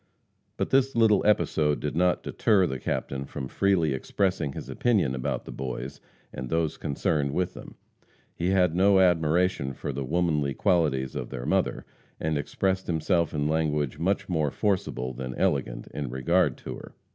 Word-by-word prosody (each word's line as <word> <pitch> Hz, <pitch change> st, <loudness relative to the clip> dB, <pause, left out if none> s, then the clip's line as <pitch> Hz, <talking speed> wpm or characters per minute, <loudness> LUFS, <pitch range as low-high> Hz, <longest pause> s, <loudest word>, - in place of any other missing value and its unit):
But -, -, -2 dB
this 135 Hz, 0 st, +3 dB
little 110 Hz, -3 st, +4 dB
episode 75 Hz, -7 st, +2 dB
did 75 Hz, +1 st, -3 dB
not 90 Hz, +1 st, +2 dB
deter 100 Hz, -4 st, +2 dB
the 65 Hz, -5 st, -3 dB
Captain 70 Hz, +2 st, -3 dB
from 70 Hz, -1 st, -6 dB
freely 90 Hz, -3 st, +2 dB
expressing 85 Hz, +1 st, -1 dB
his -, -, -7 dB
opinion 105 Hz, -, +1 dB
about 65 Hz, -1 st, -3 dB
the -, -, -8 dB
boys 65 Hz, +1 st, -5 dB, 0.3 s
and 65 Hz, -1 st, -6 dB
those 80 Hz, 0 st, 0 dB
concerned 70 Hz, 0 st, -1 dB
with 90 Hz, +1 st, -1 dB
them. -, -, -11 dB, 0.6 s
He 85 Hz, +2 st, -1 dB
had 90 Hz, -3 st, +3 dB
no 95 Hz, +2 st, +4 dB
admiration 85 Hz, -4 st, +2 dB
for 70 Hz, -, -5 dB
the 70 Hz, +1 st, -3 dB
womanly 75 Hz, -2 st, 0 dB
qualities 80 Hz, -9 st, +1 dB
of -, -, -4 dB
their 60 Hz, -2 st, -6 dB
mother, -, -, 0 dB, 0.3 s
and 80 Hz, 0 st, -1 dB
expressed 95 Hz, +6 st, -1 dB
himself 85 Hz, 0 st, +1 dB
in 75 Hz, -1 st, -1 dB
language 75 Hz, -3 st, 0 dB
much 95 Hz, +4 st, 0 dB
more 80 Hz, -5 st, +1 dB
forcible 95 Hz, -, -1 dB
than 65 Hz, 0 st, -5 dB
elegant -, -, 0 dB
in 70 Hz, -4 st, -4 dB
regard 70 Hz, +3 st, +1 dB
to -, -, -5 dB
her. -, -, -12 dB
80 Hz, 165 wpm, -27 LUFS, 70-90 Hz, 0.6 s, little